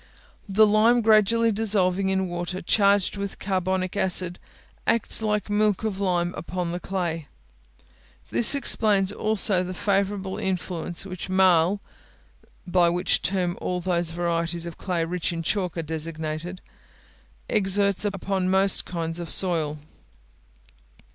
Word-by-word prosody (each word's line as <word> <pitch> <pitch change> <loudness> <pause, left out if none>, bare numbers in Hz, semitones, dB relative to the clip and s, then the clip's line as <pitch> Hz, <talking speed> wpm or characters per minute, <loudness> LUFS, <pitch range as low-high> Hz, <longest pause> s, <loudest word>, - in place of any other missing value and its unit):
The 215 +3 +5
lime 220 +3 +4
gradually 225 +1 +3
dissolving 195 -3 0
in 190 0 0
water 175 +1 -4
charged 200 +1 +2
with 200 0 -5
carbonic 185 -1 -2
acid, 185 -2 +1 0.5
acts 230 -1 +2
like 210 -2 -1
milk 210 0 +1
of 210 -3 -3
lime 175 -2 0
upon 175 0 -4
the 175 - -4
clay. 170 -5 -3 1.0
This 235 +4 +5
explains 210 -7 +1
also 210 -3 +1
the 185 0 -6
favourable 195 0 -1
influence 180 -2 -2
which 185 0 -7
marl 185 0 +3 0.8
(by 175 -1 +3
which 175 +1 +1
term 180 -2 0
all 180 0 -2
those 175 -2 0
varieties 170 0 -2
of 170 -2 -7
clay 175 -4 -1
rich 175 0 -2
in 165 -1 -4
chalk 180 -1 -2
are 165 - -2
designated) 160 +2 -5 0.9
exerts 200 -1 +2
upon 195 -2 -2
most 190 +1 +3
kinds 165 -1 -3
of 170 - -6
soil. 160 -5 +2
185 Hz, 130 wpm, -24 LUFS, 175-200 Hz, 1.0 s, The